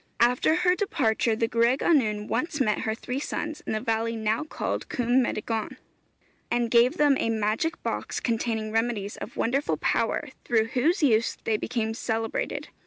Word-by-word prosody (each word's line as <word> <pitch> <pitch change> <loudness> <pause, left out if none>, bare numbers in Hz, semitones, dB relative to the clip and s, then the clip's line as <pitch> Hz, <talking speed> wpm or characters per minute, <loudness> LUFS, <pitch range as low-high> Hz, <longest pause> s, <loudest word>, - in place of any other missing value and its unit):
After 250 +6 +3
her 360 +1 +3
departure, 235 - +1
the 230 +1 0
gwraig 235 +3 +2
annwn 215 -10 +2
once 295 +6 -2
met 215 -5 +2
her 220 0 -1
three 250 +3 -4
sons 305 +1 -4
in - - -1
the 215 - 0
valley 225 +1 -1
now 220 +4 0
called 305 - -4
Cwm 245 +1 +2
Meddygon, 225 -2 -2 0.7
and 240 -1 0
gave 245 +7 +4
them 290 -2 +4
a - - 0
magic 220 +8 -1
box - - -3
containing 225 -2 -1
remedies 225 -3 -1
of - - -8
wonderful 275 +5 0
power, 295 - 0
through 225 -1 +1
whose 310 - +1
use 230 -5 +3
they 220 - +1
became 220 0 -2
celebrated. 225 0 -3
230 Hz, 165 wpm, -26 LUFS, 220-265 Hz, 0.7 s, gave